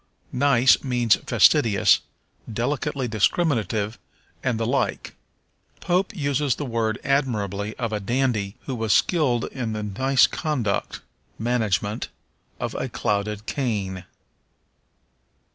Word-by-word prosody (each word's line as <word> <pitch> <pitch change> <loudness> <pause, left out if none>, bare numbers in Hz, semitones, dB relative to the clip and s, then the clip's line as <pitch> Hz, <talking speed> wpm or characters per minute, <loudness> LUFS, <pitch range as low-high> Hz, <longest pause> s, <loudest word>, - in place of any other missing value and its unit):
Nice 130 -1 +4
means 120 -4 +3
fastidious, 105 -4 +4 0.5
delicately 130 +3 -2
discriminative, 110 - 0 0.4
and 125 -4 0
the 115 - 0
like. 125 +1 -1 0.7
Pope 185 +3 0
uses 145 -3 0
the 145 - -4
word 115 -3 -1
admirably 105 -7 -1
of 115 -3 -3
a 105 - -1
dandy 110 -2 -1
who 135 - -5
was 110 -3 0
skilled 140 -9 +2
in 120 -5 -3
the 105 0 -3
nice 130 +6 +3
conduct 130 -11 -2 0.4
[management] 110 -3 -1 0.5
of - - -3
a - - -3
clouded 105 +1 -2
cane. 100 - -2
115 Hz, 110 wpm, -24 LUFS, 105-135 Hz, 0.7 s, Nice